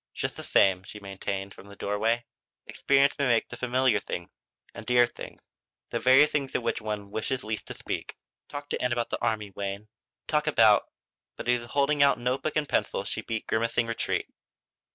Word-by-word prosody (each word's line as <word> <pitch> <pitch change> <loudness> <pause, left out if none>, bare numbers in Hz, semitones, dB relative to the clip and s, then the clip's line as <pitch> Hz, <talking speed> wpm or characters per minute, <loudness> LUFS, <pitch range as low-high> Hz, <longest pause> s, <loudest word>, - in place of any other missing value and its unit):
"Just - - -3
the - - -7
same," 95 -2 +3
she 105 +2 -10
maintained, 95 0 -5
from 100 - -14
the 100 - -12
doorway, 110 +4 0 0.4
"experience 140 0 +2
may 140 - +2
make 115 -2 +2
the - - -7
familiar 125 -3 +2
things 85 -3 -6 0.4
and - - -8
dear 125 +1 +5
things 120 - -10 0.5
the 120 - -1
very 130 +5 +7
things 140 -3 -2
of - - 0
which 115 - -1
one 105 -2 -4
wishes 125 +5 -2
least 110 0 -4
to - - -7
speak. - - -5 0.3
Talk 145 0 -6
to - - -2
Ann 125 -1 +1
about 120 -1 -2
the - - -2
army, 105 -3 -1
Wayne; 100 +2 -5 0.4
talk 150 0 0
about 110 -8 +5 0.2
" - - -66
But - - -7
as - - +5
he 125 - +2
was 120 - -11
holding 145 +1 +2
out 140 0 +5
note 125 +2 -1
book 155 - -2
and 150 -2 +1
pencil 95 - 0
she 100 +2 -3
beat 115 -1 -4
grimacing 115 +1 +1
retreat. 115 0 -1
115 Hz, 205 wpm, -28 LUFS, 105-130 Hz, 0.5 s, very